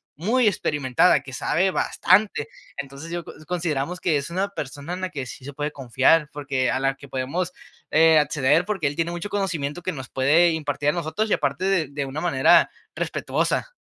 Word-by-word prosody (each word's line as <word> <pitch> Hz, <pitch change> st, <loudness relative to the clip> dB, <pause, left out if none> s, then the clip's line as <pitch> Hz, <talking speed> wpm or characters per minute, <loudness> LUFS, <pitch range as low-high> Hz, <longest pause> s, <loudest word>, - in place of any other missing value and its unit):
muy 220 Hz, -, +2 dB
experimentada, 145 Hz, -3 st, +2 dB
que 135 Hz, -, -10 dB
sabe 180 Hz, +8 st, +1 dB
bastante. 185 Hz, -5 st, +2 dB, 0.3 s
Entonces 140 Hz, +3 st, -7 dB
yo 175 Hz, -1 st, -3 dB
con -, -, -12 dB
consideramos 170 Hz, -1 st, -2 dB
que 160 Hz, -5 st, +2 dB
es 140 Hz, +2 st, -4 dB
una 190 Hz, +4 st, -1 dB
persona 145 Hz, -3 st, -7 dB
en 180 Hz, -, -4 dB
la 185 Hz, -, -2 dB
que 135 Hz, -3 st, -5 dB
sí 130 Hz, +1 st, -10 dB
se 145 Hz, -, -7 dB
puede 150 Hz, +2 st, -3 dB
confiar, 135 Hz, +4 st, +2 dB
porque 140 Hz, -3 st, -1 dB
a 130 Hz, -, 0 dB
la 135 Hz, 0 st, +1 dB
que 140 Hz, -, -13 dB
podemos, 140 Hz, +8 st, -3 dB, 0.4 s
eh, 160 Hz, 0 st, +6 dB
acceder, 150 Hz, +2 st, +2 dB
porque 190 Hz, -8 st, -1 dB
él 145 Hz, -, -4 dB
tiene 165 Hz, +1 st, 0 dB
mucho 175 Hz, +4 st, -5 dB
conocimiento 175 Hz, -6 st, -2 dB
que 185 Hz, +2 st, -3 dB
nos 130 Hz, -3 st, -8 dB
puede 155 Hz, +6 st, +4 dB
impartir 145 Hz, -2 st, -1 dB
a -, -, +4 dB
nosotros 170 Hz, +6 st, -2 dB
y -, -, +3 dB
aparte 185 Hz, -, -1 dB
de 190 Hz, -6 st, +2 dB
de 145 Hz, 0 st, -4 dB
una 135 Hz, +3 st, -5 dB
manera 135 Hz, -7 st, +4 dB, 0.3 s
respetuosa. -, -, -1 dB
155 Hz, 195 wpm, -24 LUFS, 140-180 Hz, 0.4 s, eh